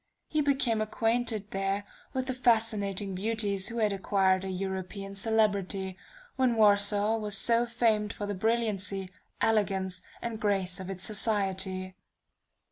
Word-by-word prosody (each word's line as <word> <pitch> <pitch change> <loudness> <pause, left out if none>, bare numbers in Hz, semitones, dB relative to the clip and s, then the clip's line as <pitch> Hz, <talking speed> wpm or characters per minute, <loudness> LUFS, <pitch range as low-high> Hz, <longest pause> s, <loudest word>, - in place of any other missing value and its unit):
He 305 - +1
became 270 -6 +1
acquainted 225 -1 0
there 195 +1 -1 0.3
with 260 -1 -2
those 260 -1 -4
fascinating 215 -5 +1
beauties 200 -1 0
who 235 - -3
had 215 -3 +2
acquired 190 -1 +2
a 190 - -4
European 190 +1 -4
celebrity, 200 -3 +1 0.4
when 255 -3 +3
Warsaw 205 0 +4
was 210 -2 0
so 235 +2 +3
famed 225 -3 +1
for 205 - -5
the 205 - -2
brilliancy, 200 -3 -1 0.3
elegance, 190 -4 +1 0.2
and 230 -2 -4
grace 195 -3 0
of 190 0 -6
its 190 -1 -5
society. 190 -3 -1
205 Hz, 130 wpm, -29 LUFS, 195-225 Hz, 0.4 s, Warsaw